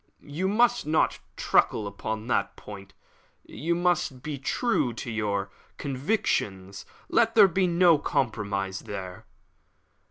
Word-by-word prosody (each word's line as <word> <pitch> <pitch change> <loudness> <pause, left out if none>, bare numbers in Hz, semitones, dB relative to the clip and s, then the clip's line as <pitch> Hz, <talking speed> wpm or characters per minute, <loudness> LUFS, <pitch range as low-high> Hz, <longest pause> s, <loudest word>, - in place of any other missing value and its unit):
"You 185 +5 -1
must 235 -1 +2
not 155 +1 +2 0.2
truckle 110 - +2
upon 110 +2 -5
that 100 -5 0
point. 100 -2 -11 0.5
You 170 +3 -2
must 175 -7 0
be 150 -2 -5
true 135 - 0
to 115 +1 -6
your 100 -3 -2 0.3
convictions; 125 - -2 0.2
let - - +2
there - - +8
be 185 +1 +1
no 170 -2 +4
compromise 100 -8 -2
there." 95 -3 -8
125 Hz, 120 wpm, -27 LUFS, -, 0.5 s, there